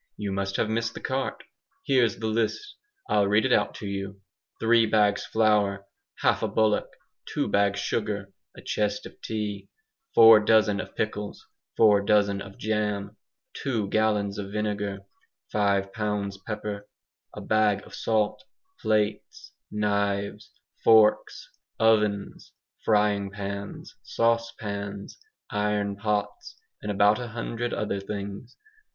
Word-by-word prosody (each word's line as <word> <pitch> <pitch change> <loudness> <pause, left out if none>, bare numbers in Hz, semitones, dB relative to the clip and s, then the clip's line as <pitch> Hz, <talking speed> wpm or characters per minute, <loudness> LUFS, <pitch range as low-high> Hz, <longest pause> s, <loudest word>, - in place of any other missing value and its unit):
You 100 -1 -3
must 95 0 -2
have - - +1
missed 115 +1 -2
the - - -6
cart. 130 0 -3 0.4
Here's 125 -6 +3
the 110 - -5
list. 115 - -1 0.3
I'll 100 - +3
read 105 +4 +3
it 130 - +3
out - - +2
to 105 - -6
you: 100 0 -5 0.4
three 115 0 +4
bags 105 -1 +2
flour, 105 -3 +2 0.4
half - - +2
a - - +1
bullock, 110 -1 +1 0.4
two - - -1
bags 100 0 +2
sugar, 100 -2 -2 0.2
a - - -11
chest 105 -1 -1
of - - -13
tea, 105 -2 -4 0.5
four 115 -1 +9
dozen 105 -1 +3
of - - -7
pickles, 105 -1 -4 0.3
four 105 -3 +6
dozen 100 -1 +2
of 100 0 -10
jam, 105 -1 -2 0.4
two 115 -7 -2
gallons 105 -2 +1
of 100 -1 -6
vinegar, 105 -2 -2 0.5
five 100 -2 +1
pounds 105 -2 -2
pepper, 105 -2 -5 0.5
a - - -6
bag 105 -2 +2
of - - -15
salt, 110 +3 0 0.4
plates, 105 -1 -1 0.2
knives, 100 -1 -1 0.3
forks, 110 -1 +4 0.3
ovens, 105 -3 +1 0.3
frying 105 -2 +2
pans, 100 0 -6
saucepans, 105 -4 -2 0.3
iron 105 -1 0
pots, 105 0 -3 0.2
and 105 - -5
about 105 +3 +4
a 120 - -5
hundred 115 +1 -4
other 100 -2 -2
things. 100 +4 -7
105 Hz, 130 wpm, -26 LUFS, 100-110 Hz, 0.5 s, four